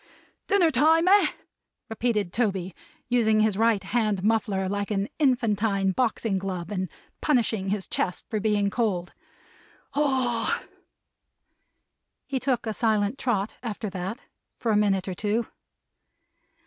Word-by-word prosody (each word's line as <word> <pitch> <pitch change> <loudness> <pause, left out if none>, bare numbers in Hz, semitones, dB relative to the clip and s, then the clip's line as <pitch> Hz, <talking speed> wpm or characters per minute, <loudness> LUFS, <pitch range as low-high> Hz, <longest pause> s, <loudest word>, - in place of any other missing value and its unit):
"Dinner 365 -5 +4
time, 320 +6 +4
eh!" 400 +2 +6 0.6
repeated 220 -5 -1
Toby, 195 -6 -1 0.3
using 220 -3 +3
his 215 -2 +2
right 220 -2 +2
hand 210 -2 0
muffler 210 -3 +1
like 200 +1 -2
an 200 -1 0
infantine 215 -7 +2
boxing 225 -2 0
glove, 185 -1 -4
and 185 -3 -2 0.3
punishing 225 -8 +1
his 200 -1 -1
chest 180 - -2
for 215 - -2
being 205 -1 +1
cold. 190 -6 -1 0.8
"Ah 260 -5 +1
h - - -9
h - - -16
h!" - - -23 1.6
He 270 -2 -2
took 255 -2 0
a 220 - -2
silent 215 +1 +1
trot, 210 -4 -1
after 215 -3 -4
that, 190 +7 -5 0.3
for 230 - -1
a - - +3
minute 200 -2 +2
or 190 - -2
two. 210 +5 -1
215 Hz, 135 wpm, -26 LUFS, 195-240 Hz, 1.6 s, eh